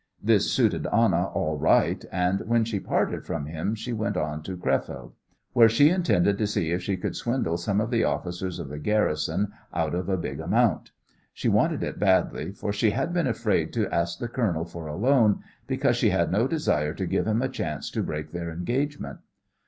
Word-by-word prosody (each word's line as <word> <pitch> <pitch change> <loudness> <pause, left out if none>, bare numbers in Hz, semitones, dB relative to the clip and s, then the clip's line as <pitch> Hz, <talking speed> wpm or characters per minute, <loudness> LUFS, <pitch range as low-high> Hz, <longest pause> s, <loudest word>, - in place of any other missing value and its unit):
This - - +2
suited - - +2
Anna 95 -5 +3
all 75 -4 -2
right, - - +3
and 90 +2 +1
when 115 0 +3
she 110 -3 -2
parted - - -1
from 75 -3 -4
him 80 +8 -3
she 120 +3 -5
went 110 -3 -1
on 75 -2 -2
to 90 +3 -6
Crefeld, 65 -5 -2 0.4
where 115 -2 +7
she 145 +8 +5
intended 100 - +2
to 105 - +1
see 85 -6 -1
if 90 +1 0
she 95 +1 -2
could - - -3
swindle 120 -9 -1
some 100 +4 0
of 110 +3 -1
the 115 -2 +2
officers 90 +5 -2
of 85 -6 -6
the 75 +1 -6
garrison 95 0 0 0.2
out 80 -2 -1
of 90 +2 -2
a 95 - +1
big 85 - -4
amount. - - +1 0.5
She - - 0
wanted - - +2
it - - -4
badly, 95 -1 +2
for 100 +1 -4
she 105 +2 +2
had 165 +11 -1
been 175 -5 +1
afraid 110 -9 0
to 110 -4 -1
ask 85 0 0
the 120 - -4
colonel 100 -10 -1
for 85 -2 -8
a 75 - -5
loan, 115 -1 +3 0.3
because - - +1
she - - +3
had - - +1
no 110 +7 +2
desire 75 - 0
to - - -2
give - - 0
him 110 +3 +1
a - - +1
chance 75 - -4
to - - -1
break 75 0 -4
their 85 -1 -4
engagement. 130 - -3
95 Hz, 205 wpm, -26 LUFS, 85-115 Hz, 0.5 s, where